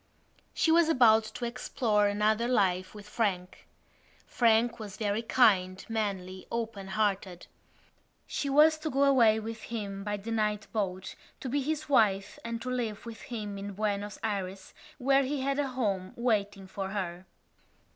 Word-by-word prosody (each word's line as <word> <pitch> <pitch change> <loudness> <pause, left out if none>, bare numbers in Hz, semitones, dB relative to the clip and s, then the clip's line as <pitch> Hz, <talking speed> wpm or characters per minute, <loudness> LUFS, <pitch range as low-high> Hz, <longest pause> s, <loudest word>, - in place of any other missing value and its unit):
She 325 - +2
was 335 0 +5
about 225 -7 +5
to 220 +3 -6
explore 230 -3 0
another 215 +3 +1
life 185 -5 +1
with 210 -1 -11
Frank. 195 -5 -2 0.6
Frank 235 0 +2
was 210 -2 -8
very 210 0 -1
kind, 190 -6 +3
manly, 195 -4 -3
open 225 -4 -4
hearted. 195 -3 -1 0.8
She 280 - -3
was 310 +3 +5
to 310 0 -3
go 275 0 +2
away 235 -6 +5
with 225 0 -6
him 200 -4 -5
by 205 0 -2
the 210 +3 -7
night 215 -1 0
boat 190 -3 -2 0.3
to - - -4
be 285 +3 0
his 310 +2 -2
wife 210 -8 +2
and 230 0 -4
to 255 - -3
live 235 -4 -3
with 230 -1 -8
him 210 -4 -6
in 200 0 -6
Buenos 205 0 -2
Ayres 195 -3 -4 0.2
where 275 +1 +3
he 275 +1 -2
had 275 +1 0
a 285 - +1
home 205 -8 -2
waiting 205 -5 0
for 190 0 -5
her. 185 -2 -4
215 Hz, 155 wpm, -29 LUFS, 200-245 Hz, 0.8 s, was